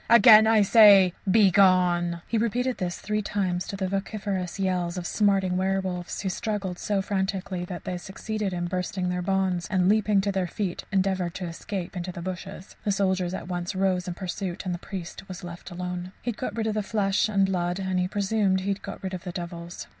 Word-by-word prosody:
Again 220 -1 +8
I 220 -2 +5
say, 200 -4 +7 0.2
Begone!" 180 -4 +4
He 225 - 0
repeated 245 +3 0
this 175 -1 -2
three 210 +1 -2
times 185 -3 -1
to - - -4
the 195 -1 -2
vociferous 195 -2 -3
yells 180 -2 -1
of 180 - -3
the - - -4
smarting 195 -3 +2
werwolves, 190 -2 -2
who 190 - -1
struggled 195 -2 -3
so 200 -2 0
frantically 190 -2 -2
that 180 -1 -7
they 180 -1 -4
succeeded 205 +2 -4
in 175 -1 -2
bursting 180 +1 -2
their 180 0 -1
bonds, 185 -1 0
and, 185 -2 +2
leaping 210 0 +3
to 200 +1 0
their 190 -2 -1
feet, 190 -2 -4
endeavoured 190 -3 0
to 185 - -4
escape 180 +2 -5
into 180 0 -4
the 175 - -8
bushes. 185 +1 -7
The 210 - +1
soldiers 190 -2 0
at 175 - -7
once 175 +1 -3
rose 185 -1 +1
in 175 - -4
pursuit 185 0 -4
and 180 - -1
the 175 - -4
priest 190 0 -7
was 185 0 -8
left 175 +1 -8
alone. 180 +1 -5
He 240 - -1
had 225 - -11
got 220 -4 -4
rid 225 - 0
of 220 - 0
the 215 - 0
flesh 205 0 +1
and 200 -2 +3
blood, 180 -2 -1
and 190 -1 -1
he 180 - +1
presumed 200 -1 +1
he 195 - -3
had 200 0 -1
got - - -8
rid 190 0 -4
of 180 - -5
the 180 - -5
devils. 170 -1 -7
190 Hz, 215 wpm, -26 LUFS, 180-200 Hz, 0.2 s, Again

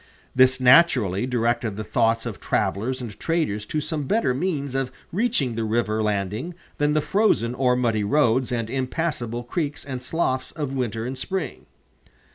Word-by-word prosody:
This 130 0 +5
naturally 125 - +5
directed 120 -3 0
the 110 - -4
thoughts 115 0 +1
of - - -5
travelers 125 +7 -1
and 115 -5 -8
traders 150 -12 -1
to 155 - -1
some 150 -1 -3
better 205 - +1
means 140 -2 -2
of 135 -1 -1 0.2
reaching 170 - +1
the 115 0 -2
river 110 -1 0
landing 105 - -2 0.2
than 145 +1 +2
the 155 - +3
frozen 170 - +2
or 125 -1 +2
muddy 115 -4 +1
roads 130 +1 +2
and 115 -2 -1
impassable 130 -2 -2
creeks 145 +3 -3
and 130 -3 -5
sloughs 130 -1 -1
of 145 -4 -4
winter 115 -4 -2
and 130 +1 -5
spring. 185 0 -4
125 Hz, 160 wpm, -24 LUFS, 115-145 Hz, 0.2 s, This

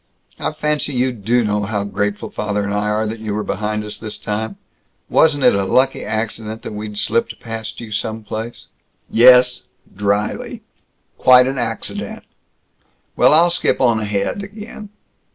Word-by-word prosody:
"I - - -1
fancy 150 -1 -1
you 125 +1 +2
do 120 +2 +1
know 105 -1 0
how 105 0 -2
grateful 105 0 -2
father 105 -1 -2
and 100 0 -2
I 105 +1 0
are 105 +1 0
that 110 +1 -4
you 110 -2 -3
were 105 - -1
behind 105 +2 -2
us, 105 - -6
this 110 -1 -5
time! 105 -1 -4 0.5
Wasn't 145 -4 +4
it 125 - +6
a 100 0 +1
lucky 130 +7 +2
accident 110 0 -4
that - - -6
we'd 105 0 -6
slipped 115 +2 -1
past 115 -1 -6
you 115 -2 -8
some 110 +1 -3
place!" 110 +2 -6 0.5
"Yes," 125 +1 +6 0.3
dryly, 105 +1 -1 0.6
"quite 125 0 +7
an 135 0 -2
accident. 115 -2 -4 0.9
Well, - - +5
I'll 170 +3 +5
skip 170 - +1
on 120 -3 +3
ahead 105 - -2
again. 210 +1 -9
110 Hz, 160 wpm, -19 LUFS, 105-125 Hz, 0.9 s, quite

